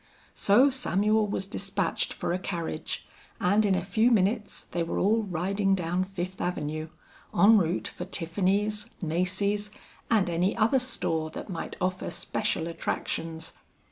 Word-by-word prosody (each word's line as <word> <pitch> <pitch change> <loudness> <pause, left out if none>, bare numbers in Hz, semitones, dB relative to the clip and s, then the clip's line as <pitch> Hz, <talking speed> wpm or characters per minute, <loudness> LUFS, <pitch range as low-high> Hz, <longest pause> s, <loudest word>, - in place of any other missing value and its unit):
So 250 +8 +5
Samuel 215 -3 +2
was 195 -1 -2
despatched 195 -2 -1
for - - -2
a 180 - -1
carriage, 170 -4 -4 0.3
and 205 +4 +3
in 200 -2 +3
a 185 - -1
few 220 +4 +3
minutes 210 -1 +1
they 175 - -3
were 165 - -2
all 220 +4 +3
riding 195 +1 +1
down 180 0 0
Fifth 185 -1 -5
Avenue, 155 -2 -2 0.5
en 210 +5 +7
route 175 0 0
for 180 - -6
Tiffany's, 200 +5 0
Macy's, 195 +5 0 0.4
and 215 -5 +3
any 175 +4 +1
other 230 +4 +4
store 160 -11 -1
that 160 - -8
might 170 - -5
offer 185 0 -1
special 200 -6 -2
attractions. 165 -1 -3
190 Hz, 140 wpm, -28 LUFS, 170-210 Hz, 0.5 s, en